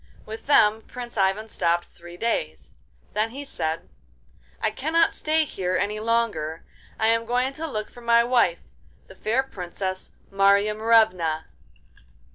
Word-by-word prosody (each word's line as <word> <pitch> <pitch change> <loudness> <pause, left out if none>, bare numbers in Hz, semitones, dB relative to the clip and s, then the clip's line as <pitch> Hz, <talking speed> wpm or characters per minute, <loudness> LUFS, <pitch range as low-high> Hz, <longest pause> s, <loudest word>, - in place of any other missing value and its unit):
With 220 +4 -9
them 220 -6 +5
Prince 240 +1 -9
Ivan 200 +2 +1
stopped 175 -4 0
three 175 0 -13
days; 175 - -2 0.4
then 215 +2 +1
he 275 +5 -8
said: 165 - -3 0.7
'I - - 0
cannot 330 +1 +2
stay 310 0 +1
here 185 -8 -2
any 205 +2 -1
longer. 215 -9 -1 0.4
I 220 - +2
am 230 0 +3
going 250 +3 0
to 320 +3 -4
look 215 -7 -4
for 245 - -13
my 235 0 +4
wife, 235 -8 +2 0.4
the - - -14
fair 235 +5 0
Princess 185 -4 -5 0.2
Marya 200 +1 +4
Morevna. 210 -8 +2
215 Hz, 140 wpm, -24 LUFS, 185-235 Hz, 0.7 s, them